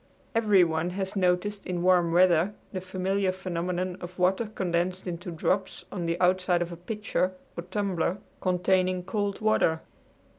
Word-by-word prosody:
Everyone 180 -7 +3
has 190 0 -2
noticed 195 +2 0
in 175 -1 -2
warm 180 -2 +4
weather 180 +2 +4 0.2
the 185 - -3
familiar 190 +1 0
phenomenon 180 0 -3
of 180 0 -8
water 190 +5 +2
condensed 185 -2 -1
into 175 -1 -5
drops 180 +3 -1
on 175 -3 -3
the 170 +1 -1
outside 180 -1 +3
of 175 - -8
a - - -5
pitcher 185 0 -2 0.2
or - - -3
tumbler 185 -2 -1 0.2
containing 185 0 +1
cold 205 +1 -2
water. 165 -7 +2
185 Hz, 145 wpm, -27 LUFS, 175-195 Hz, 0.2 s, warm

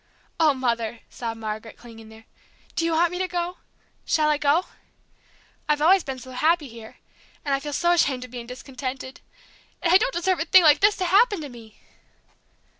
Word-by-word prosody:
"Oh, 310 -3 +4
Mother!" 235 -3 -2
sobbed 230 -2 -6
Margaret, 220 0 -6
clinging 225 -2 -13
there, 220 0 -16 0.5
"do 330 - 0
you 335 - 0
want 335 +1 +2
me 360 - -4
to 370 - 0
go 355 0 -3 0.5
shall 305 -1 +1
I 300 -1 +1
go? 300 +5 +2 1.0
I've 300 0 +2
always 355 +4 +4
been 270 -2 -5
so 255 +1 -11
happy 310 +4 +1
here, 225 -2 -12 0.5
and 280 - 0
I 275 - +1
feel 295 +1 -6
so 345 +4 +1
ashamed 275 -7 +1
of 250 - -15
being 240 -2 -8
discontented, 255 +1 -7 0.6
and 340 - +1
I - - +9
don't - - 0
deserve 365 -3 0
a 325 - -1
thing 365 +2 +6
like 305 -2 +6
this 410 +1 +4
to 370 - -2
happen 405 +3 +3
to 290 - -7
me!" 225 -3 -14
290 Hz, 190 wpm, -24 LUFS, 240-345 Hz, 1.0 s, I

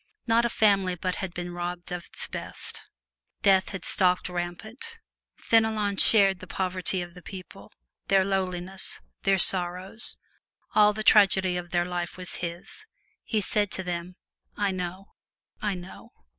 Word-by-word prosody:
Not 230 0 +3
a - - +1
family 195 -5 +2
but 180 +1 -3
had 190 -2 -4
been 175 0 -6
robbed 175 0 -5
of 180 -1 -5
its - - -6
best. - - -4 0.6
Death 190 -2 +4
had 190 - -5
stalked 180 -2 +3
rampant. 215 - -6 0.4
Fenelon 220 -3 +1
shared 195 -4 +6
the 185 - -11
poverty 185 0 0
of 175 0 -11
the 180 - -13
people, 185 0 -11 0.4
their 195 -1 +3
lowliness, 190 -1 0 0.2
their 195 0 +2
sorrows. 185 +3 +3 0.6
All 210 -1 +6
the 215 +1 -4
tragedy 190 -4 +5
of 175 -1 -5
their 175 0 0
life 175 0 -4
was 180 -1 -5
his; 175 - -7 0.4
he 215 -3 -1
said 205 +1 0
to 190 - -2
them, 180 0 -5 0.4
"I 205 -1 +1
know, 185 +1 -6 0.5
I 205 -2 -1
know!" 180 +1 -11
185 Hz, 150 wpm, -26 LUFS, 180-205 Hz, 0.6 s, shared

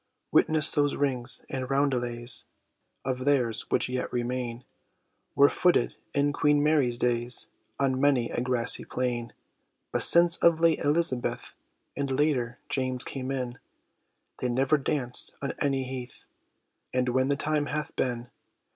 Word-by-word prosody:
Witness 155 -1 +4
those 145 -1 +1
rings 125 -4 -1
and 130 -1 -5
roundelays 125 -3 0 0.6
Of 130 -1 -3
theirs, 125 -6 +2
which - - +1
yet 125 0 -3
remain, 125 0 -3 0.7
Were - - +6
footed - - +1 0.2
in 145 0 +1
Queen 145 -1 +2
Mary's 145 -6 +2
days 120 0 0 0.3
On 135 -1 0
many 135 -5 +2
a - - -2
grassy 125 -2 +2
plain; 120 -2 -3 0.6
But - - -1
since 170 0 +5
of 170 -1 +3
late 165 -1 +3
Elizabeth, 145 -4 0 0.4
And 140 -1 -3
later, 130 -3 0
James 130 -2 -1
came 130 -1 -5
in, 125 -2 -4 0.8
They 125 - -1
never 135 +5 +2
danced 135 -3 +2
on 140 - -4
any 135 -2 0
heath 130 -1 -8 0.7
As 125 0 +2
when 130 +1 +1
the 140 - +1
time 150 +1 -1
hath 150 0 -4
been. 120 -1 -3
130 Hz, 140 wpm, -27 LUFS, 125-145 Hz, 0.8 s, Were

